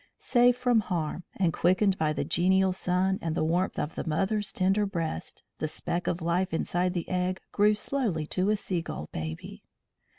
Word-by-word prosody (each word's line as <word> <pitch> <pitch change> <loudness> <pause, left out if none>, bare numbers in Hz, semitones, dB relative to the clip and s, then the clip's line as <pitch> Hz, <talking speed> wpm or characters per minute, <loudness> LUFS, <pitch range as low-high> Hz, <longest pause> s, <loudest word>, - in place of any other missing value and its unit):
Safe 245 0 +3
from 245 -2 +3
harm, 175 -4 -3
and 180 -4 +1
quickened 185 +4 +3
by 155 -4 +1
the 150 - -2
genial 185 +3 +3
sun 185 +1 0
and 165 -1 -2
the - - +1
warmth 175 +4 0
of 150 - -2
the - - -4
mother's 195 +5 0
tender 195 +2 +2
breast, 170 -5 -4 0.2
the 155 - -1
speck 170 +3 -3
of 170 0 -1
life 170 +1 0
inside 180 +2 0
the 170 - -2
egg 185 0 -1
grew 210 +1 +4
slowly 210 - -1
to 185 +5 0
a 215 - +4
seagull 170 - -4
baby. 80 0 -6
180 Hz, 175 wpm, -28 LUFS, 165-195 Hz, 0.2 s, grew